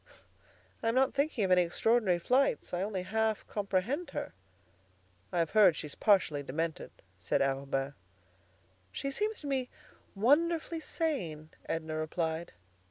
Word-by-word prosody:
"I'm 230 Hz, +1 st, +1 dB
not 265 Hz, 0 st, +3 dB
thinking 280 Hz, -5 st, 0 dB
of 190 Hz, -, +1 dB
any 180 Hz, 0 st, +6 dB
extraordinary 190 Hz, +2 st, +2 dB
flights. 255 Hz, +8 st, +1 dB
I 175 Hz, -, 0 dB
only 195 Hz, -2 st, -2 dB
half 220 Hz, +2 st, 0 dB
comprehend 205 Hz, -, -1 dB
her." -, -, -4 dB, 1.0 s
"I've 170 Hz, -2 st, 0 dB
heard 200 Hz, -6 st, +6 dB
she's 150 Hz, -2 st, -6 dB
partially 185 Hz, -9 st, +3 dB
demented," 160 Hz, +4 st, -3 dB, 0.3 s
said 90 Hz, -, 0 dB
Arobin. 135 Hz, 0 st, -1 dB, 1.0 s
"She 275 Hz, -, -3 dB
seems 425 Hz, +9 st, -1 dB
to 295 Hz, -, -6 dB
me 265 Hz, -2 st, -1 dB, 0.5 s
wonderfully 325 Hz, +9 st, +2 dB
sane," 180 Hz, -, -3 dB, 0.2 s
Edna 160 Hz, -1 st, -2 dB
replied. 160 Hz, +1 st, -2 dB
195 Hz, 125 wpm, -31 LUFS, 160-260 Hz, 1.0 s, any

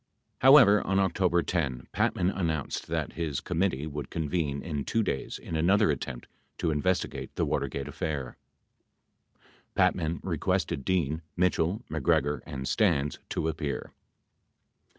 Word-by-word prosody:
92 130 Hz, -, +5 dB
However, 125 Hz, -8 st, +8 dB
on 95 Hz, -, +2 dB
October 90 Hz, -2 st, +2 dB
10, 70 Hz, -6 st, -1 dB
Patman 90 Hz, +2 st, +1 dB
announced 80 Hz, -7 st, -2 dB
that -, -, -2 dB
his 80 Hz, -5 st, -2 dB
committee 80 Hz, -5 st, -1 dB
would 75 Hz, -3 st, -5 dB
convene 75 Hz, -3 st, -2 dB
in 75 Hz, -4 st, -3 dB
2 115 Hz, +8 st, 0 dB
days 65 Hz, -, -3 dB
in 80 Hz, -, -6 dB
another 95 Hz, +4 st, +4 dB
attempt 65 Hz, -3 st, -5 dB, 0.3 s
to 80 Hz, -, 0 dB
investigate 90 Hz, +5 st, -1 dB
the -, -, +1 dB
Water -, -, 0 dB
gate 70 Hz, -, -5 dB
affair. 70 Hz, -5 st, -4 dB, 1.4 s
Patman 80 Hz, 0 st, +2 dB
requested 70 Hz, -, -1 dB
Dean, 80 Hz, -3 st, 0 dB, 0.2 s
Mitchell, 90 Hz, +4 st, +1 dB
MacGregor 75 Hz, -1 st, +1 dB
and 65 Hz, -4 st, -5 dB
Stans 80 Hz, -10 st, +1 dB
to 80 Hz, -, -1 dB
appear. 75 Hz, -3 st, -3 dB
80 Hz, 130 wpm, -28 LUFS, 70-90 Hz, 1.4 s, However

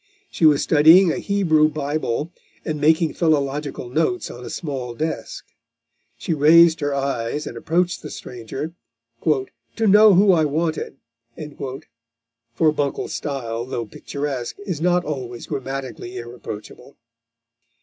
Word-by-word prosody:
She 160 Hz, -, +4 dB
was 145 Hz, -2 st, +4 dB
studying 165 Hz, +4 st, +6 dB
a -, -, -2 dB
Hebrew 165 Hz, -7 st, +2 dB
Bible, 150 Hz, 0 st, -2 dB, 0.3 s
and 155 Hz, -2 st, -3 dB
making 160 Hz, 0 st, +3 dB
philological 145 Hz, -4 st, -1 dB
notes 160 Hz, +8 st, -1 dB
on 120 Hz, -, -10 dB
a -, -, -7 dB
small 130 Hz, -7 st, -5 dB
desk. 160 Hz, +5 st, -4 dB, 0.7 s
She 175 Hz, -, -2 dB
raised 160 Hz, +2 st, +6 dB
her 145 Hz, -1 st, -1 dB
eyes 135 Hz, +1 st, -2 dB
and -, -, -7 dB
approached 175 Hz, +9 st, 0 dB
the 150 Hz, -, -8 dB
stranger, 135 Hz, +7 st, -7 dB, 0.5 s
"to 130 Hz, -, -1 dB
know 210 Hz, 0 st, +7 dB
who 195 Hz, +2 st, +6 dB
I 165 Hz, -3 st, +3 dB
wanted" 155 Hz, -1 st, -2 dB, 1.6 s
(for 155 Hz, +5 st, +3 dB
Buncle's 145 Hz, -2 st, -2 dB
style, 120 Hz, -5 st, -4 dB
though 120 Hz, -2 st, -4 dB
picturesque, 135 Hz, +2 st, -5 dB
is 175 Hz, -6 st, -4 dB
not 180 Hz, 0 st, +2 dB
always 125 Hz, -5 st, -5 dB
grammatically 130 Hz, -2 st, -5 dB
irreproachable.) 120 Hz, +1 st, -9 dB
150 Hz, 125 wpm, -22 LUFS, 130-165 Hz, 1.6 s, know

